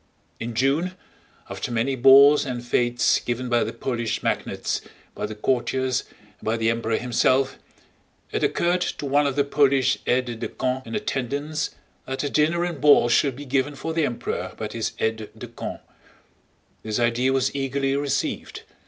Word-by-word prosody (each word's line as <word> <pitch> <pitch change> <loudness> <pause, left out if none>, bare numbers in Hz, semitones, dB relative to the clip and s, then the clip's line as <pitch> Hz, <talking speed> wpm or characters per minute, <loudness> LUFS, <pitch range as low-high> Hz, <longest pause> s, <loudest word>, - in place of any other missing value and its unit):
In 115 0 -5
June, 145 +9 +1 0.5
after - - -5
many 120 +4 0
balls 135 +3 +7
and 125 -3 -5
fetes 120 0 +2
given 120 +1 -3
by 120 -1 +3
the 110 - -3
Polish 115 -1 -3
magnates, - - -1 0.3
by - - -4
the 110 - -7
courtiers, 130 +2 0
and - - -27
by 110 +1 0
the 115 0 +2
Emperor 115 -1 -1
himself, 130 +2 +1 0.7
it - - -1
occurred 175 +1 +1
to 165 - -3
one 145 +1 +3
of 135 - -2
the 145 - +3
Polish 140 -2 +2
aides 125 -2 +1
de - - -3
camp 130 0 -3
in - - -5
attendance 150 - -2 0.3
that 130 +2 -3
a 145 - -2
dinner 160 +3 +2
and 170 -6 -3
ball 145 -5 +6
should 130 +2 +3
be 145 +3 -8
given 135 +2 0
for 160 +4 -4
the 165 -1 +1
Emperor 120 -5 -3
by - - -3
his - - -3
aides 110 0 -1 0.2
de - - -7
camp. - - -7 1.0
This 110 -1 -3
idea 120 +2 +2
was 135 0 +1
eagerly 135 0 0
received. 140 0 -2
130 Hz, 170 wpm, -24 LUFS, 120-145 Hz, 1.0 s, balls